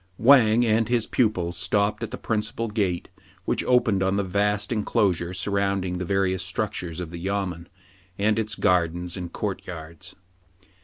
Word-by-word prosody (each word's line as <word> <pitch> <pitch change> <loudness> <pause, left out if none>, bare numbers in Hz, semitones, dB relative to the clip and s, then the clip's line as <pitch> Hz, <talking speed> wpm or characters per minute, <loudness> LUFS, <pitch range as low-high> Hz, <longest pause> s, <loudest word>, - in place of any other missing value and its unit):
Wang 120 -2 +6
and 110 0 +2
his 120 -2 +2
pupil 100 -8 +1
stopped 100 +4 0
at - - -3
the - - -6
principal 110 +1 -2
gate, 100 -5 -1 0.4
which - - 0
opened 120 -6 +3
on 95 +1 +1
the 100 - +1
vast 100 +2 0
enclosure 95 -5 +1
surround 100 +1 0
ing 90 -1 -3
the 90 - -3
various 95 0 +1
structures 90 -3 -3
of 85 -2 -5
the 85 - -7
yamen, 95 -2 -3 0.5
and 105 +2 +2
its 110 -1 -1
gardens 90 -1 +1
and 90 -2 -6
court - - -4
yards. 85 -2 -8
100 Hz, 160 wpm, -25 LUFS, 90-105 Hz, 0.5 s, Wang